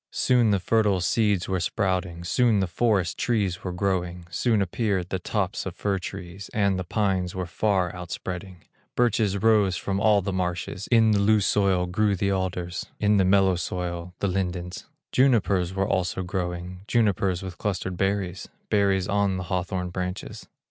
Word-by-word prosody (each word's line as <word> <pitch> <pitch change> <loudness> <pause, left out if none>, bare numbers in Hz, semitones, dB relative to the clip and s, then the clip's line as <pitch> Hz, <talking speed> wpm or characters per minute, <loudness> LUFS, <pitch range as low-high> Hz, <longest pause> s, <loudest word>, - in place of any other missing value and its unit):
Soon 120 -3 +3
the 100 -2 +3
fertile 105 0 +2
seeds 100 0 +1
were 95 -1 0
sprouting, 90 -2 -1
Soon 115 +3 +2
the 95 - +2
forest 95 0 0
trees 100 -7 0
were 90 - -3
growing, 90 -2 -2
Soon 110 +6 +1
appeared 95 -1 -1
the 95 - -2
tops - - -2
of - - -6
fir 100 -2 -1
trees, 95 +1 -8
And 100 -3 +2
the - - -2
pines 95 -2 -1
were 90 -1 -2
far 90 0 0
outspreading; 90 0 -6 0.3
Birches 115 -5 +2
rose 105 -3 +3
from 95 +2 -2
all 105 -2 +4
the 95 0 -2
marshes, 90 +1 -3
In 115 -2 +4
the 105 - +3
loose 105 0 +3
soil 95 -2 +2
grew 100 +3 +1
the 100 +1 0
alders, 90 -2 -2
In 105 0 +3
the 95 - +4
mellow 95 -1 +4
soil 90 0 -4
the 100 - +1
lindens; 90 -1 -3 0.2
Junipers 100 -9 +3
were 95 0 +1
also 95 0 -1
growing, 90 -1 -4
Junipers 100 -5 +1
with 95 -2 -7
clustered 95 -2 -2
berries, 95 -1 -2 0.2
Berries 100 -2 +2
on 100 -2 +1
the 90 - -3
hawthorn 90 0 -2
branches. 90 0 -5
95 Hz, 165 wpm, -25 LUFS, 90-100 Hz, 0.3 s, all